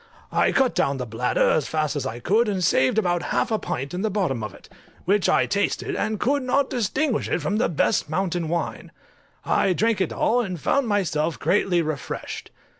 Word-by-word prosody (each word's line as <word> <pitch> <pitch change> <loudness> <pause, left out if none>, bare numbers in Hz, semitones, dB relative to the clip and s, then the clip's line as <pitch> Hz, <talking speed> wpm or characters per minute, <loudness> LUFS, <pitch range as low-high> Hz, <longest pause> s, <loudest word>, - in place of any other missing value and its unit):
I - - +2
cut 265 -2 +2
down 140 0 +1
the 125 - -3
bladder 115 +2 +1
as 155 - +1
fast 155 -1 -1
as 145 - -2
I 115 - -5
could, 215 - +2
and 190 -3 -1
saved 130 +2 +3
about 175 -5 +1
half - - -1
a 220 - +1
pint 135 +5 -4
in 180 - -3
the 220 - 0
bottom 185 - -1
of 105 - -4
it, - - -16 0.4
which 200 +1 +2
I - - +3
tasted, 200 - -1
and 215 -1 -1
could 280 +6 +1
not 265 +2 +1
distinguish 245 +3 0
it - - 0
from 195 +7 -1
the 225 - +1
best 155 -2 +1
mountain 175 -1 -1
wine. 170 +1 -3 0.5
I 190 - +2
drank 220 +2 +1
it 185 - 0
all, 245 +2 +2
and 185 -7 -4
found 275 - +1
myself 170 -6 0
greatly 180 -3 +2
refreshed. 155 -3 -5
185 Hz, 200 wpm, -24 LUFS, 155-220 Hz, 0.5 s, saved